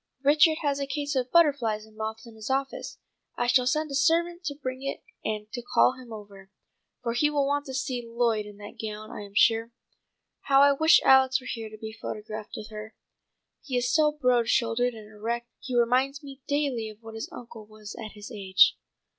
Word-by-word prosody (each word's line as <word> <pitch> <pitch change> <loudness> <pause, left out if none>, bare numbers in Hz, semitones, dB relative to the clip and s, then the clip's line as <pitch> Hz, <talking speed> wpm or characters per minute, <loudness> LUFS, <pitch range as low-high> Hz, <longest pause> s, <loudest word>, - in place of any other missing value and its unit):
Richard 310 +3 +5
has 285 -1 0
a 280 - -2
case 285 +1 -3
of 255 -1 0
butterflies 275 -10 +3
and 220 0 -20
moths 220 +1 -5
in 230 - -12
his 220 +1 -8
office. 270 +1 -2 0.4
I 240 - +1
shall 250 0 +3
send 305 +3 0
a - - -4
servant 340 +5 +2
to 285 -3 -2
bring 260 -2 -5
it 275 0 -4 0.2
and 210 -1 -3
to 245 - -5
call 245 - +3
him 255 -2 -13
over, 200 -3 -11 0.5
for 235 -1 -1
he 295 +5 +2
will 290 -2 +1
want 285 +1 -1
to 265 - -5
see 255 -2 -2
Lloyd 230 -2 0
in 205 -1 -12
that 205 0 -11
gown 215 0 -6
I - - -7
am 200 0 -11
sure. 225 +1 +4 0.8
How 275 0 +6
I 285 - +7
wish 315 +4 +5
Alex 265 0 +5
were 255 - -15
here 225 -3 -5
to 215 - -11
be 220 0 -7
photographed 215 -1 -7
with 215 +1 -8
her. 215 +1 -8 0.7
He 255 -3 -2
is 245 +1 0
so 310 -2 +4
broad 250 -5 +2
shouldered 240 0 +1
and 215 -1 -11
erect 230 +3 -4
he 255 -2 -3
reminds 260 +5 +2
me 275 -1 -11
daily 280 -6 0
of 215 +1 -14
what 225 0 -9
his 225 0 -6
uncle 230 -3 -10
was 215 -1 -10
at 215 - -8
his 210 +4 -10
age." 190 -3 +4
245 Hz, 210 wpm, -27 LUFS, 220-275 Hz, 0.8 s, I